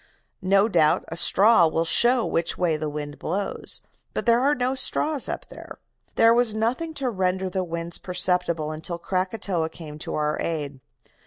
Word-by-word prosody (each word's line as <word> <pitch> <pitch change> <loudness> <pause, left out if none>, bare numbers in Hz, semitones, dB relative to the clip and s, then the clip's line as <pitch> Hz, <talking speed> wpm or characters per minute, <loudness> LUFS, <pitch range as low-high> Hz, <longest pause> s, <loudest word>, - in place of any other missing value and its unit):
No 195 +2 +3
doubt 165 -4 +2
a 165 - -5
straw 195 +1 +5
will 165 +1 -1
show 240 +7 +3
which 165 0 -1
way 170 -3 +1
the 155 0 -3
wind 145 0 -6
blows, 195 +4 -3 0.3
but - - -2
there 235 0 +4
are 280 +3 +2
no 250 +1 -1
straws 280 +2 +1
up - - -5
there. - - -11 0.4
There 230 0 +5
was 235 -2 +2
nothing 255 +9 -2
to 265 -3 -1
render 185 -1 -1
the 185 0 -1
winds 170 0 -5
perceptible 180 -4 +1
until 160 +3 -5
Krakatoa 185 -2 -2
came 155 -2 -10
to - - -5
our 150 0 -1
aid. 145 -4 -4
180 Hz, 170 wpm, -24 LUFS, 165-230 Hz, 0.4 s, straw